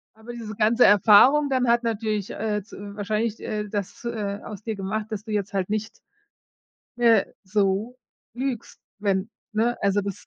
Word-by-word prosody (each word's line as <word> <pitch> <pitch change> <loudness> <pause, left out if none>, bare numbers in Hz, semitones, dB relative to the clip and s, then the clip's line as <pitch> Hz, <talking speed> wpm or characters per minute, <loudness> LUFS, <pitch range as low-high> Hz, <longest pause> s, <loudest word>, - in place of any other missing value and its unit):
Aber 220 +2 -10
diese 225 -3 -7
ganze 225 +4 +4
Erfahrung 225 +9 +6
dann 255 -2 +1
hat 235 +1 +4
natürlich, 215 -3 -2
äh, 210 -2 -2
z 210 - -23 0.2
wahrscheinlich, 215 +2 -1
äh, 210 -1 -4
das, 205 +3 -5
äh, 205 -4 -3
aus 210 -1 -8
dir 220 0 -3
gemacht, 205 +2 -3
dass 210 -1 -5
du 225 - -9
jetzt 205 -2 -2
halt 190 0 -1
nicht 215 +1 -1 1.1
mehr 230 -4 +3
so 200 +4 0 0.4
lügst, 255 -2 -4 0.2
wenn 200 0 0 0.2
ne? 230 +3 +1
Also 200 0 +2
das 200 -1 -6
215 Hz, 165 wpm, -24 LUFS, 205-230 Hz, 1.1 s, Erfahrung